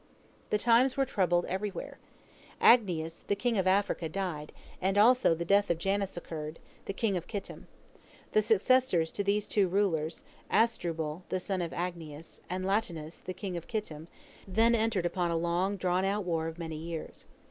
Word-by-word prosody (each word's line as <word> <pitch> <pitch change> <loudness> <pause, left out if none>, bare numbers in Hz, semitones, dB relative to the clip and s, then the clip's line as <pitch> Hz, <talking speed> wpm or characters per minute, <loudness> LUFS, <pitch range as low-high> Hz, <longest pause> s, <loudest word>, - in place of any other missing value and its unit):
The 210 - +2
times 240 +5 +4
were 270 - +3
troubled 175 -6 +1
everywhere. 195 +2 -4 0.6
Agnias, 170 -9 +4
the 200 - +2
king 240 +3 0
of 185 - +1
Africa, 190 -4 +1
died, 165 -5 -4 0.3
and 190 +2 +1
also 240 -4 +5
the 170 +1 -4
death 200 +3 +3
of 170 - +2
Janus 195 +1 -1
occurred, 155 -2 -6 0.3
the - - -3
king 200 0 0
of 175 - -6
Kittim. 205 -3 -6 0.6
The 215 - +4
successors 215 -5 +3
to 200 - -2
these 205 +1 +1
two 200 -3 +2
rulers, 175 -4 0 0.3
Asdrubal, 165 -8 0
the 185 - 0
son 190 0 -2
of 170 - -2
Agnias, 165 -3 -6
and 185 +1 -3
Latinus, 175 -6 -2
the 185 - -7
king 185 0 -5
of 170 - -6
Kittim, 165 -8 -4 0.4
then 225 +5 +3
entered 220 -5 +1
upon 175 0 0
a 165 - 0
long 175 +4 0
drawn 180 0 +1
out 200 +2 0
war 165 -3 -1
of 165 0 -6
many 160 -2 -5
years. 165 0 -7
185 Hz, 170 wpm, -30 LUFS, 165-205 Hz, 0.6 s, also